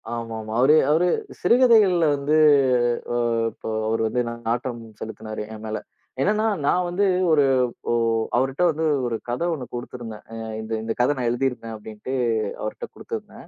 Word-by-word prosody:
ஆமாமா. 110 -2 -5
அவரு 140 +4 +6 0.2
அவரு 165 +4 +3 0.3
சிறுகதைகள்ல 215 -6 +5
வந்து 145 +2 +1 0.8
ஆ - - -1 0.4
இப்ப - - -18 0.2
அவரு 115 +1 0
வந்து 125 +3 0
நா - - -4 0.2
நாட்டம் 120 0 -2 0.2
செலுத்தினாரு, 110 0 -6
என் 110 0 -9
மேல. 110 0 -3 0.4
என்னன்னா, 215 +6 +2 0.2
நான் 180 +4 +2
வந்து 180 +4 +1 0.2
ஒரு 155 -3 +5 0.5
ஒ - - +2 0.4
அவருட்ட 135 +6 0
வந்து 160 +1 -2 0.2
ஒரு 115 - -2
கதை 125 +8 -1
ஒண்ணு 135 -6 -5
குடுத்திருந்தேன். 120 -3 -7
"அ - - -9 0.3
இந்த 110 +1 -5
இந்த 115 0 -2
கதை 125 +4 +3
நான் 125 -2 0
எழுதியிருக்கேன்." 120 -2 -2
அப்பிடீன்னுட்டு 110 +4 -8 0.5
அவர்ட்ட 110 - -5
குடுத்திருந்தேன். - - -8
125 Hz, 150 wpm, -23 LUFS, 115-160 Hz, 0.8 s, அவரு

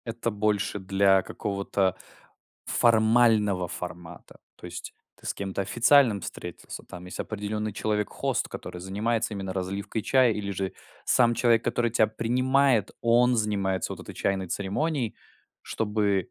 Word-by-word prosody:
Это 115 0 -2
больше 105 -1 0
для 95 0 +3
какого-то 100 -1 -1 0.7
формального 110 -4 +3
формата. 90 -1 -7 0.2
То - - -10
есть - - -8 0.2
ты - - -13
с - - -1
кем-то 95 -1 -4
официальным 120 +1 +4
встретился. 90 -1 -7
Там 90 0 -10
есть 90 - -7
определённый 105 0 -3
человек-хост, 105 0 -1
который 90 - -8
занимается 110 +4 -1
именно 95 -1 -4
разливкой 100 +4 -3
чая. 130 -1 +4
Или 100 -1 -4
же 95 0 -3 0.3
сам 120 -2 +4
человек, 115 -1 +3
который 120 0 0
тебя 110 -1 +3
принимает, 125 +1 +2
он 120 +1 +4
занимается 100 -4 0
вот - - -8
этой - - -10
чайной 95 -1 -1
церемонией, 115 - -1 0.5
чтобы, 105 -4 -1
105 Hz, 135 wpm, -26 LUFS, 95-115 Hz, 0.7 s, официальным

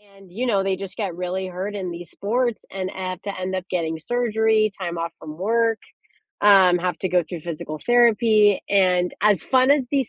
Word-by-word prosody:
and, 195 -2 -18
you 240 +7 -3
know, 200 -5 +1
they 195 -1 0
just 195 0 -8
get 195 -6 -3
really 180 +1 -3
hurt 185 +3 -5
in 185 -3 -4
these 175 0 -8
sports 235 +3 -1
and 190 -1 -4
have 185 -1 -5
to 200 -2 -5
end 185 +1 -3
up 185 -1 -4
getting 160 -3 -2
surgery, 220 0 +1
time 175 -2 -4
off 165 0 -3
from 155 0 -9
work, 225 +3 +1 0.6
um, 190 -3 +6
have 180 -1 -2
to 190 - -2
go 180 -1 +2
through 170 +1 -8
physical 155 -2 -6
therapy, 225 -4 +4
and 180 -3 +2
as 210 -5 +4
fun 260 +1 +3
as 285 -2 +4
these 270 -4 +1
190 Hz, 200 wpm, -22 LUFS, 180-220 Hz, 0.6 s, um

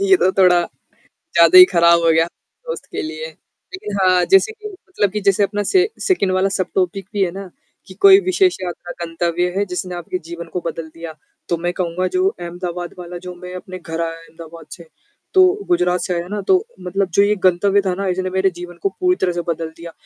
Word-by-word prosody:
ये 380 - +7
तो 185 - +2
थोड़ा, 180 -2 +4 0.7
ज़्यादा 370 - +6
ही 365 - +12
खराब 170 0 +5
हो 165 - +4
गया, 160 +1 +3 0.4
दोस्त 485 - -5
के - - -3
लिए। 330 +9 -6 0.5
लेकिन 210 - -5
हाँ, 185 -1 +4
जैसे 390 +3 +5
कि 430 -1 -10
मतलब 370 - -3
कि 210 - -2
जैसे 200 0 +2
अपना 205 +1 -1
से 380 +1 +4 0.2
सेकंड 345 - +1
वाला 185 +1 +1
सबटॉपिक 185 0 -2
भी 200 -1 +1
है 180 - -1
ना, 195 +1 -8 0.4
कि 185 - -11
कोई 390 - +7
विशेष 370 -1 +1
यात्रा 175 -1 -6
गंतव्य 170 +1 -1
है 200 - +1
जिसने 180 0 -4
आपके 175 +1 -4
जीवन 170 0 -7
को 180 - -1
बदल 165 -1 -4
दिया। 165 -1 -8 0.4
तो 170 - +1
मैं 175 - 0
कहूँगा 180 0 -2
जो 370 +1 +3
अहमदाबाद 175 - -6
वाला 175 0 -7
जो 180 - -6
मैं 180 +1 -10
अपने 185 0 -8
घर 165 -1 -5
आया 165 0 -2
अहमदाबाद 165 0 -13
से, 170 -2 -11 0.5
तो 375 +2 +4
गुजरात 180 - +1
से 180 - -2
आया 170 0 -3
ना 205 +2 -4
तो 380 +2 +3
मतलब 190 +1 -2
जो - - +7
ये 205 +1 +2
गंतव्य 195 +2 +3
था 185 - 0
ना 195 +1 -3
इसने 185 0 -1
मेरे 190 +1 +1
जीवन 175 0 -9
को 195 - +2
पूरी 365 0 +2
तरह 180 - +2
से 175 - -2
बदल 165 -1 -2
दिया। 170 0 -9
185 Hz, 215 wpm, -19 LUFS, 175-205 Hz, 0.7 s, ही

